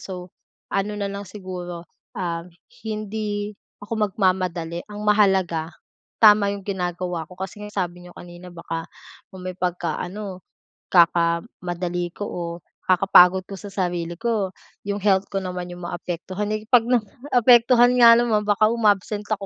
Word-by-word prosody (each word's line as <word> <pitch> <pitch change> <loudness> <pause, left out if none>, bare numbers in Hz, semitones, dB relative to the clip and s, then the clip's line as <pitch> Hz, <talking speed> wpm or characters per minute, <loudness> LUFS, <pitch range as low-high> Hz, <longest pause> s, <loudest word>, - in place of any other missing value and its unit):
So, 180 -2 -8 0.4
ano 205 +2 -1
na 200 -1 -3
lang 200 -1 -7
siguro 180 -3 -7 0.3
ah 170 -4 -3 0.4
hindi 210 -1 -3 0.3
ako 220 +2 -4
magmamadali 185 -4 -1
ang 210 0 -8
mahalaga, 190 -6 +2 0.5
tama 210 -1 +7
yung 200 - -8
ginagawa 180 -3 -3
ko 180 - -14
kasi 190 +2 -7
nga 210 0 -9
sabi 180 -2 -3
niyo 175 - -14
kanina 175 0 -12
baka 165 -1 -5 0.5
kung 185 - -9
may 185 0 -6
pagka-ano 180 +2 -3 0.5
kaka-madali 175 0 +1
ko 205 - -3
o 180 - -5 0.5
kakapagod 185 0 +6
ko 200 - -10
sa 205 - -8
sarili 175 -3 -3
ko 220 -4 -1 0.3
yung 200 0 -3
health 195 -1 +3
ko 195 - -3
naman 180 -2 -4
yung 175 0 -8
maapektuhan. 180 +4 -4
Eh, 215 - -12
'pag 230 0 +4
naapektuhan 245 +1 +4
nga 230 0 +9
naman 230 -3 +2
baka 210 +2 +2
umabsent 210 -2 +1
ako, 205 -2 -2
190 Hz, 140 wpm, -23 LUFS, 175-210 Hz, 0.5 s, nga